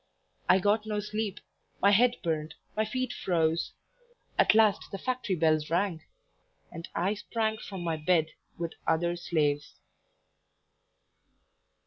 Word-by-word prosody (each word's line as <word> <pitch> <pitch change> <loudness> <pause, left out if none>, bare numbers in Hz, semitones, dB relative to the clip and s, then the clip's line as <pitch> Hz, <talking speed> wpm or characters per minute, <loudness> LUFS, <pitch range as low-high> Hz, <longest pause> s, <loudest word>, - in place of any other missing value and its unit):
I 185 - +7
got 210 +3 +1
no 210 -1 -1
sleep; 210 -1 -3 0.4
my 200 - +5
head 240 +4 +5
burned, 155 -2 -2 0.2
my 215 +1 +1
feet 255 +4 -2
froze; 165 -2 0 0.6
at - - +4
last 220 -2 +4
the 195 - -4
factory 250 -3 -1
bells 155 -2 +2
rang, 175 -1 0 0.7
and 165 0 -8
I 185 +4 +1
sprang 220 +1 -2
from 195 -4 -7
my 165 -2 -1
bed 160 0 +2 0.3
with 170 -1 -3
other 170 +2 +2
slaves. 150 -4 -1
185 Hz, 125 wpm, -29 LUFS, 165-215 Hz, 0.7 s, I